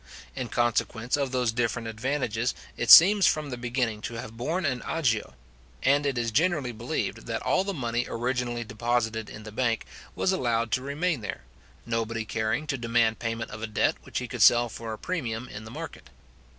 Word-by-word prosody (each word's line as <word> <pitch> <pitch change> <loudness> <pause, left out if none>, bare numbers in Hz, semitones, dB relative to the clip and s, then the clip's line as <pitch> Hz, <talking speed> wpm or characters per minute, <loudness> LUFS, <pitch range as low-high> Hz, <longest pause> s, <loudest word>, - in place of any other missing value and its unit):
In 130 -2 -3
consequence 120 0 0
of 140 -3 -1
those 125 -3 +1
different 115 0 -1
advantages, 120 0 -1 0.2
it - - -3
seems 195 +2 +10
from 150 -2 0
the - - -2
beginning 120 -3 -2
to 115 - -5
have 115 -1 -7
borne 160 +10 -2
an 130 -3 0
agio; 115 - -1 0.5
and 140 +2 +3
it 135 -3 -1
is 115 -1 -1
generally 150 -1 +1
believed 120 +6 -4
that 115 0 -3
all 185 - +2
the 200 - -2
money 120 -3 -1
originally 120 0 -2
deposited 115 0 -1
in 110 - -9
the 110 - -9
bank, 115 0 0 0.3
was 190 - +1
allowed 115 - 0
to 130 - +1
remain 145 +1 -1
there, 80 -12 -6 0.4
nobody 115 -1 -2
caring 110 +7 -1
to 135 -4 -2
demand 115 -1 +2
payment 115 0 -3
of 110 - -7
a 115 - -2
debt 105 - +1
which - - -6
he - - -2
could - - -5
sell 120 0 +6
for 115 0 -6
a 110 - -5
premium 125 -9 -3
in 110 -2 -9
the - - -9
market. - - -8
120 Hz, 190 wpm, -27 LUFS, 115-135 Hz, 0.5 s, seems